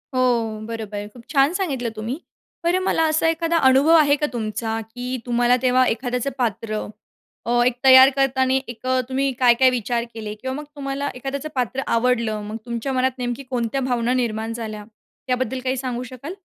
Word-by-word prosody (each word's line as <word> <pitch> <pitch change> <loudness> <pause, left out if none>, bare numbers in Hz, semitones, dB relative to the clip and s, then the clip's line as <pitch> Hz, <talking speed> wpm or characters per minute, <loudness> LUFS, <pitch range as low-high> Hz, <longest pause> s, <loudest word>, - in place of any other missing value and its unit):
हो, 235 -4 +1
बरोबर, 210 -2 -5
खूप 240 -2 -14
छान 280 +2 +3
सांगितलं 275 -11 -2
तुम्ही. 230 +8 -4 0.4
बरं 350 +2 +2
मला 325 - +2
असा 315 +1 +2
एखादा 330 0 0
अनुभव 280 +5 +5
आहे 290 -2 +5
का 295 - 0
तुमचा 225 0 -2
की 245 +3 -5
तुम्हाला 245 0 +3
तेव्हा 255 0 +4
एखाद्याचं 250 +2 -1
पात्र 220 -2 -2 0.6
अ 240 +1 +2
एक 250 -1 +2
तयार 260 0 +9
करताना 265 -1 +2
एक 240 +1 -8 0.2
तुम्ही 270 +1 0
काय-काय 250 +1 +5
विचार 240 -1 -1
केले 215 -2 -6
किंवा 260 +4 -5
मग 300 - -5
तुम्हाला 280 0 -3
एखाद्याचं 275 +4 -5
पात्र 255 +1 -1
आवडलं, 230 -3 +1
मग 210 +1 -6
तुमच्या 235 +3 -3
मनात 260 0 +2
नेमकी 245 +2 -3
कोणत्या 250 +1 -1
भावना 245 -1 0
निर्माण 225 -2 -1
झाल्या 215 -2 -6 0.4
त्याबद्दल 255 0 -1
काही 260 0 -1
सांगू 250 -1 -3
शकाल? 270 +7 -8
250 Hz, 170 wpm, -22 LUFS, 230-270 Hz, 0.6 s, तयार